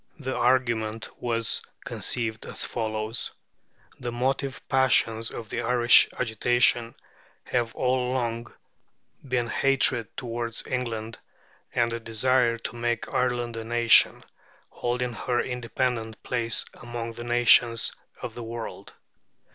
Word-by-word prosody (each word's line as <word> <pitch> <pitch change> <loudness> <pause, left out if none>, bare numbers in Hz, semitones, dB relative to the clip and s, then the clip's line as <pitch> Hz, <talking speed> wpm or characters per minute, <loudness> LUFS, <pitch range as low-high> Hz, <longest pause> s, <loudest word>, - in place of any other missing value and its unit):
The 130 -3 -4
argument 120 -3 +1
was 115 -2 0 0.2
conceived 110 -2 -3
as - - -2
follows: 110 0 -3 0.7
"The 120 -1 -4
motive 130 +1 -1
passions 115 -4 +3
of 110 -2 -8
the - - -2
Irish 120 0 +6
agitation 120 0 +2 0.5
have 120 -2 -1
all 125 -1 +1
along 120 -2 -2 0.8
been 125 -2 0
hatred 130 -3 +2
toward 115 -1 -4
England 115 -3 -4 0.6
and 120 -1 +2
a 115 - -3
desire 115 +1 +2
to 115 - -6
make 120 -1 -2
Ireland 120 -2 0
a 115 - -4
nation, 120 0 +5 0.5
holding 125 0 -2
her 120 +1 -1
independent 125 -2 -2
place 115 -2 +1
among 120 -1 -6
the 120 +1 -8
nations 120 -1 +4 0.3
of - - -5
the 120 - -8
world. 115 0 -7
120 Hz, 115 wpm, -26 LUFS, 115-125 Hz, 0.8 s, Irish